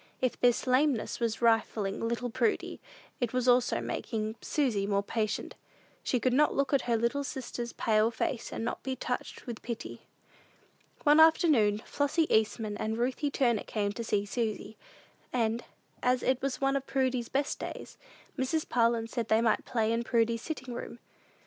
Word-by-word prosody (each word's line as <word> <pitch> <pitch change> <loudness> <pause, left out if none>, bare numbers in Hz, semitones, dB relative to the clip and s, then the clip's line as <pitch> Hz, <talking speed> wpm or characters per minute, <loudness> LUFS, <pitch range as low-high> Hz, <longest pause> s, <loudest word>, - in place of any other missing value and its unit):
If 255 -2 -1
this 245 -1 +3
lameness 255 -1 +1
was 230 0 -1
refining 220 -3 +2
little 235 +1 -2
Prudy, 415 - -1 0.4
it 245 -2 -1
was 255 0 0
also 245 0 +4
making 220 -2 -3
Susy 230 -10 0
more 200 -1 +1
patient. 215 0 -2 0.5
She 250 - 0
could 255 +1 +1
not 300 +3 +3
look 275 0 0
at 265 -3 +1
her 230 - +3
little 235 +5 0
sister's 245 -3 -5
pale 215 0 +2
face, 235 +1 -3
and 225 - -3
not - - -3
be 265 -1 -3
touched 250 0 -4
with 235 -3 -6
pity. 235 -2 -6 1.0
One 295 0 +6
afternoon, 295 - +5
Flossy 285 +3 +1
Eastman 215 -1 0
and 220 +1 -2
Ruthie 255 +4 0
Turner 240 -6 +1
came 205 -2 -2
to 230 +3 -5
see 210 -3 0
Susy; 220 0 -3 0.6
and, 230 -1 0 0.4
as 250 0 +2
it 260 0 +1
was 275 -2 -2
one 275 0 +1
of 275 0 -2
Prudy's 260 -3 0
best 280 +1 -1
days, - - -7 0.4
Mrs. 285 +5 0
Parlin 230 -1 +2
said 230 -1 -3
they 220 0 +4
might 225 -2 +1
play 225 -1 0
in 230 +1 0
Prudy's 230 -1 +1
sitting 260 -5 -5
room. 235 - -6
235 Hz, 170 wpm, -30 LUFS, 225-260 Hz, 1.0 s, One